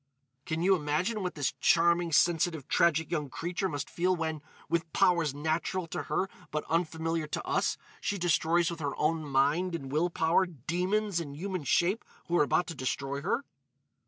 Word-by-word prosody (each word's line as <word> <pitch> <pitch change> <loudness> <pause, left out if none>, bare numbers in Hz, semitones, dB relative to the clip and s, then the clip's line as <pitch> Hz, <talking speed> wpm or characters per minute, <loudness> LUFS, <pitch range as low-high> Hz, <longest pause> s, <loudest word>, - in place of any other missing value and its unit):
Can 160 0 -1
you 190 +1 +5
imagine 175 +8 -1
what 180 -1 -3
this 145 -4 -1
charming, 170 0 +3
sensitive, 165 -2 +2
tragic 165 -1 +2
young 150 -5 -1
creature 175 +6 -2
must 145 -2 -4
feel 180 +2 +1
when, 160 -3 -3 0.3
with 165 -1 -1
powers 170 -6 +3
natural 160 +4 -1
to - - -3
her 190 - +1 0.2
but 150 0 -3
unfamiliar 165 -1 0
to - - -4
us, - - +1 0.2
she 205 - -2
destroys 170 0 +2
with 170 - -6
her 145 -2 -2
own 160 +1 +1
mind 150 +6 +1
and 135 -5 -6
will 160 +5 +2
power 170 +3 +2
demons 180 - -1
in 145 -4 -6
human 185 +1 -4
shape 185 - +2 0.2
who 175 - -1
are - - +6
about 155 +4 +2
to 170 - -6
destroy 140 0 -3
her? 235 - -1
165 Hz, 175 wpm, -30 LUFS, 150-175 Hz, 0.3 s, are